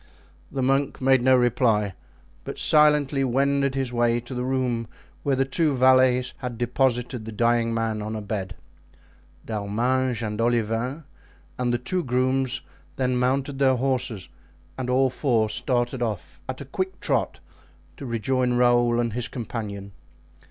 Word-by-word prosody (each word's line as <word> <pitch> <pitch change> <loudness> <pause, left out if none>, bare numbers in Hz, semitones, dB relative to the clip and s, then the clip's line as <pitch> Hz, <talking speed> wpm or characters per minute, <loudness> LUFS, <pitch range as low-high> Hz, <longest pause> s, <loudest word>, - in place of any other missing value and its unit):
The 135 - -2
monk 135 +2 +1
made 130 -1 +4
no 130 +1 +5
reply, 115 -5 +2 0.5
but - - -6
silently 150 -2 +3
wended 140 +1 +1
his 135 -2 -2
way 120 0 +2
to 120 +3 -9
the 125 0 -2
room 125 -3 -1 0.3
where 140 -1 +1
the 135 +1 +1
two 150 +1 +1
valets 130 -1 +4
had 125 -3 -5
deposited 125 0 0
the 110 - -7
dying 115 +1 +1
man 115 -1 -1
on 110 +1 -4
a 110 - -4
bed. 100 -3 -4 0.9
D'Arminges 115 +4 -1
and 105 +1 -3
Olivain 120 +5 0 0.6
and 125 -1 +1
the 120 - +1
two 175 +9 -2
grooms 130 0 0 0.3
then 130 -1 0
mounted 135 +2 0
their 135 -1 +4
horses, 125 -6 -1 0.5
and 125 -1 -4
all 130 +1 +3
four 115 -5 +1
started 120 0 -1
off 110 -6 -4
at 130 - -5
a - - -6
quick 185 +7 -4
trot - - -1 0.6
to 140 - -7
rejoin 125 +2 0
Raoul 120 -1 +3
and 120 -2 -1
his 120 0 -2
companion. 105 -4 -6
125 Hz, 150 wpm, -24 LUFS, 115-130 Hz, 0.9 s, no